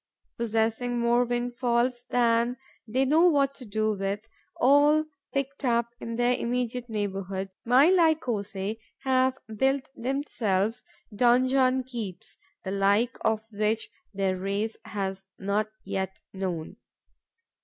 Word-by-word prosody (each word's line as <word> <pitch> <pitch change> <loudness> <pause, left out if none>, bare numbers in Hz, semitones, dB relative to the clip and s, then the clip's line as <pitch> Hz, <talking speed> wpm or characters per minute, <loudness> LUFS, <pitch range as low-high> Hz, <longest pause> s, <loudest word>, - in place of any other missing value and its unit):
Possessing 230 +2 0
more 240 +1 +3
windfalls 240 0 0
than 235 0 +2 0.3
they 260 +5 +1
know 320 +6 +5
what 280 -3 +2
to 260 - -11
do 215 0 0
with, 200 +2 -3 0.3
all 290 +4 +5 0.3
picked 275 +1 -3
up 235 -2 +2
in 230 0 -5
their 245 +1 +3
immediate 245 0 -2
neighbourhood, 195 -2 -3
my 260 +8 +6
Lycosae 225 - +1 0.2
have 260 -1 +2 0.2
built 265 +2 +1
themselves 230 -5 -1 0.3
donjon 255 +3 +3
keeps 220 -8 -7 0.2
the 190 - -4
like 200 +5 +2
of 220 0 +1
which 215 +2 0 0.2
their 195 -2 0
race 200 +4 -2
has 195 -2 -4
not 200 +2 0 0.2
yet 190 -1 -3
known. 185 -1 -4
235 Hz, 115 wpm, -27 LUFS, 200-255 Hz, 0.3 s, my